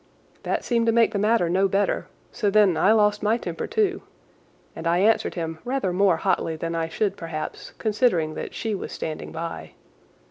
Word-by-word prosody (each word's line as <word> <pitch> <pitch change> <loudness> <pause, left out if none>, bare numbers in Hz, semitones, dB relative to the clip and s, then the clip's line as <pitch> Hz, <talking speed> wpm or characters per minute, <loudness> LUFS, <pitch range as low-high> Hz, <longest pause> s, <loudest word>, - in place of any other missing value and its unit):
That - - -2
seemed 235 -2 +1
to - - +5
make 230 0 +4
the 200 - -1
matter 215 -3 +2
no 190 +3 +2
better, 195 -2 0 0.2
so 205 - 0
then 200 -3 +4
I 200 - +4
lost 210 -1 +3
my 215 +2 +2
temper 170 -8 -5
too, 420 -4 0 0.7
and 160 - -4
I 170 +1 +3
answered 215 +4 +2
him 165 -2 -4
rather 250 -8 -1
more 185 -2 +3
hotly 165 -3 0
than 165 +1 -4
I 165 -1 -1
should 200 +4 -1
perhaps, 165 -3 -6
considering 210 -8 +1
that - - -6
she 220 -2 -2
was 195 - -5
standing 155 -1 -5
by. 160 - -6
195 Hz, 185 wpm, -24 LUFS, 165-220 Hz, 0.7 s, to